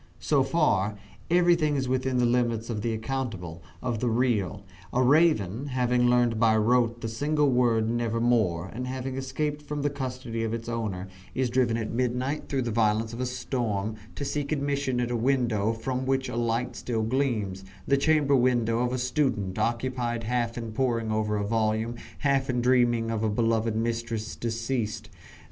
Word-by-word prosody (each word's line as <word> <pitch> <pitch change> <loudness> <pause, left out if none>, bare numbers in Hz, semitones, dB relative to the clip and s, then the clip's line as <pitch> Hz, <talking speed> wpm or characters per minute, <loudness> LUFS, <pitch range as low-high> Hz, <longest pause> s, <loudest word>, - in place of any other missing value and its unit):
So 145 -3 +2
far, 120 - +1 0.3
everything 170 -3 +3
is 135 -2 -1
within 130 0 0
the 125 - +3
limits 120 -1 +1
of 105 -2 -3
the 115 - -1
accountable 110 -8 -4 0.2
of 120 -3 -1
the 120 - +1
real. 110 -4 0 0.3
A 125 - +2
raven, 135 - +3
having 125 -2 +2
learned 120 -2 +3
by 110 -1 +4
rote 115 +1 +2
the 115 - -2
single 145 +5 +1
word 120 -3 +3
"Nevermore," 115 -6 +1
and 125 +1 -4
having 130 0 -4
escaped 145 +3 -2
from 150 -1 -4
the 145 - +1
custody 130 -4 -4
of 115 0 -1
its 115 0 -7
owner, 105 -6 -3 0.3
is 130 -2 0
driven 120 -2 +2
at 110 -2 -3
midnight, 125 +4 -1
through 135 -2 0
the 120 - -2
violence 110 0 +1
of 120 - -5
a 130 - 0
storm, 120 -5 -2 0.2
to 140 - -4
seek 140 +1 -2
admission 140 -3 0
at 120 0 -1
a - - 0
window 120 -4 +1
from 130 +3 -3
which 130 -1 0
a 120 - -5
light 120 +1 -1
still 115 -3 -2
gleams 110 -6 -1 0.2
the 140 - +4
chamber 145 -1 +3
window 120 -3 +2
of 125 0 +1
a - - 0
student, 125 -7 0
occupied 120 +1 -1
half 120 0 -1
in 115 -2 -4
poring 115 -2 0
over 105 -1 0
a 100 - -1
volume, 110 +1 0 0.3
half 135 -2 +2
in 125 -1 +1
dreaming 120 -2 +3
of 110 -1 -1
a 110 - +1
beloved 115 0 +1
mistress 115 -1 -2
deceased. 115 -2 -3
120 Hz, 175 wpm, -27 LUFS, 110-130 Hz, 0.3 s, by